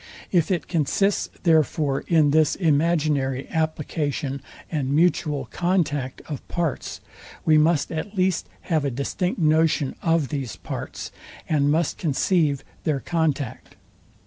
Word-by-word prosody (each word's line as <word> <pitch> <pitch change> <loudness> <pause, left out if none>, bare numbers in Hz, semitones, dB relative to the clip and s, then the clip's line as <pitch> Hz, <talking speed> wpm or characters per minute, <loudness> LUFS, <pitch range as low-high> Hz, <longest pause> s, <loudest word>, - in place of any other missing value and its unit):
If 175 -4 +3
it 180 -3 -1
consists, 180 +5 +1
therefore, 155 -4 +2
in 155 -4 +4
this 155 -1 +3
imaginary 150 -5 +1
application 150 -3 -2 0.3
and 140 -5 -1
mutual 150 -4 +2
contact 155 -7 0
of 145 -4 -5
parts, 170 -4 -3 0.4
we 155 -1 +6
must 155 -2 +2
at 175 +6 -5
least 185 -2 +1
have 160 -4 0
a 140 - +1
distinct 140 +9 -2
notion 155 -3 +2
of 165 -4 +1
these 135 -7 -3
parts, - - -6 0.4
and 145 -2 +2
must 160 +2 +1
conceive 150 -2 +1 0.2
their 150 -4 0
contact. 150 -6 -2
155 Hz, 120 wpm, -24 LUFS, 140-170 Hz, 0.4 s, we